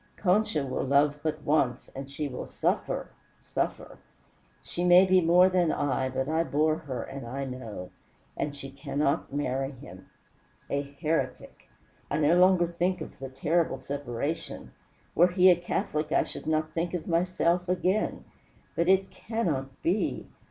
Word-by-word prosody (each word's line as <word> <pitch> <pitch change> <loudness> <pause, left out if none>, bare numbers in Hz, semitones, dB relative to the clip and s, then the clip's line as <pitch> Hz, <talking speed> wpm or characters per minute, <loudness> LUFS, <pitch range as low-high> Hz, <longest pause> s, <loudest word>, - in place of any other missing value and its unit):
Concha 180 -6 +2
will 130 - -2
love 145 +2 +3
but 155 0 -3
once, 135 -5 +1
and 135 0 -6
she 145 +1 -3
will 125 -2 -6
suffer - - -1 0.3
suffer - - -4 0.6
She 175 - -3
may 180 +1 +7
be 185 0 +4
more 175 +2 +6
than 180 -3 +2
I, 130 -2 0
but 130 +1 -2
I 160 +2 +1
bore 155 +1 +1
her 135 -7 -5
and 135 -1 -7
I 135 +3 -4
know. 115 -8 -7 0.4
And 145 -1 -3
she 135 -1 -8
cannot 140 +2 -1
marry 135 -1 -2
him. 95 -7 -13 0.6
A 140 - +1
heretic! 150 +3 -3 0.4
I - - 0
no 155 +2 +4
longer 180 -1 +5
think 175 +2 -1
of - - -9
the 135 0 -6
terrible 155 +6 0
separation. 140 +3 -4 0.4
Were 175 - +6
he 180 +1 +6
a - - +5
Catholic 170 -3 -2
I - - +4
should - - -8
not 155 0 0
think 170 +1 -1
of 165 - -4
myself 175 +1 +1
again. 185 +3 0 0.5
But 170 - +1
it 190 0 +3
cannot 150 - -3
be. 185 +6 0
155 Hz, 155 wpm, -28 LUFS, 140-175 Hz, 0.6 s, may